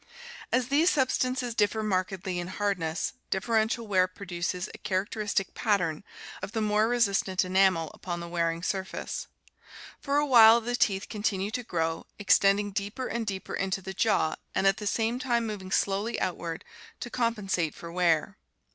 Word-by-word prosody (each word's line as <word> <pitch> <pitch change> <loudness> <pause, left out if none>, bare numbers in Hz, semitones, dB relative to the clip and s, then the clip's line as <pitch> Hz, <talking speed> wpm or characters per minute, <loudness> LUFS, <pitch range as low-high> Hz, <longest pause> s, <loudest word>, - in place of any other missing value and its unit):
As 255 0 +1
these 305 +5 +4
substances 255 -3 0
differ 215 0 +1
markedly 185 -2 -1
in 175 - -4
hard 200 0 -1
ness, 160 0 -2 0.2
differential 220 +3 0
wear 185 -3 +3
produces 180 -1 -4
a - - -11
char 190 0 0
acteristic 205 -3 -2
"pattern" 180 -6 0 0.4
of 205 - -6
the 225 - -1
more 210 +1 +2
resistent 200 -6 +1
enamel 185 -3 +2
upon 175 -2 -5
the 170 - -6
wearing 170 -1 -1
surface. 190 0 -3 0.7
For 280 +1 0
a 295 - +3
while 230 -4 +8
the 240 +1 -2
teeth 195 -4 +1
continue 205 -1 -2
to 250 - -2
grow, 165 -7 -2
extend 200 -1 +4
ing 205 0 -3
deeper 205 +6 -3
and 235 -3 -3
deeper 190 -2 -4
into 195 0 -1
the 190 0 -7
jaw 190 -5 +1 0.2
and 190 - +1
at 195 - +4
the 210 - -4
same 230 +3 0
time 240 -3 0
moving 205 -4 -5
slowly 200 +4 0
outward 170 -2 -3 0.4
to 240 - -5
compensate 205 - -1
for 170 - -9
wear. 170 -3 +1
200 Hz, 165 wpm, -28 LUFS, 185-225 Hz, 0.7 s, while